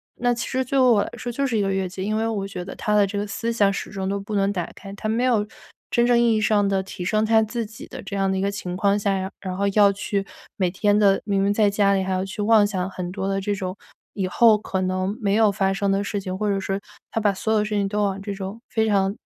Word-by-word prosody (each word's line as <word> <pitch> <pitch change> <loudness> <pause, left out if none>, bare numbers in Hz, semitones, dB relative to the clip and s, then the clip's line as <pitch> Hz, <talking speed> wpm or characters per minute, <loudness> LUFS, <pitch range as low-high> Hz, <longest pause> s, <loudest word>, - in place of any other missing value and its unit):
那 245 0 +1
其 235 - -4
实 260 0 0
作 270 +1 +1
为 255 - +5
我 215 -4 +4
来 - - -6
说 245 - -5
就 275 +3 -1
是 235 -4 0
一 - - +2
个 195 -1 0
越 190 -1 -1
界。 185 +1 -7
因 215 +2 -1
为 220 - 0
我 200 -3 -2
觉 180 -2 -6
得 190 - -7
她 210 0 0
的 205 -1 +5
这 200 +1 -4
个 205 - -3
思 230 +4 -2
想 200 -3 +3
始 - - -5
终 190 -2 -3
都 200 +1 -1
不 210 +1 -5
能 195 0 +2
打 175 -3 -3
开， 195 0 -10
她 215 +2 -4
没 235 +3 +1
有 225 -5 +2 0.5
真 240 0 +3
正 245 - +4
意 235 -1 +4
义 - - +2
上 210 -1 +3
的 195 -1 +1
提 185 - -7
升 215 +4 +1
她 220 0 +4
自 230 +1 -3
己 220 +1 -11
的 - - -8
这 200 - -6
样 195 -1 +1
的 190 - 0
一 - - -1
个 200 - +1
情 185 -3 -5
况 200 +1 +2
下， 200 -1 0
然 190 0 -3
然 185 -1 -4
后 200 - +1
要 205 -2 +6
去 200 0 -2 0.3
每 185 -3 0
天 205 +2 +2
的 200 -2 +4
明 195 -2 +1
明 200 - +2
在 205 -1 +3
家 200 -1 +2
里 195 - +2
还 190 0 -2
要 185 0 0
去 195 +2 -5
妄 215 0 +5
想 190 -2 -2
很 180 -2 -5
多 190 0 -3
的 195 0 -1
这 205 +1 -1
种 185 -2 -4 0.4
以 190 -2 -2
后 220 +2 +5
可 195 -2 -3
能 185 +2 -1
没 200 0 +1
有 220 -2 +4
发 195 -1 +1
生 195 0 0
的 195 0 +1
事 205 -1 -3
情， 185 0 -4
或 210 0 -1
者 200 - +1
是 195 +1 -2 0.3
她 225 - -1
把 205 -2 +2
所 220 +3 -2
有 215 - +3
的 210 - 0
事 210 - -6
情 200 -1 +1
都 210 +1 -1
往 195 -1 -1
这 200 0 -4
种 195 +4 -7
非 220 -1 +1
常， 195 -1 +2
200 Hz, 325 characters per minute, -23 LUFS, 195-215 Hz, 0.5 s, 要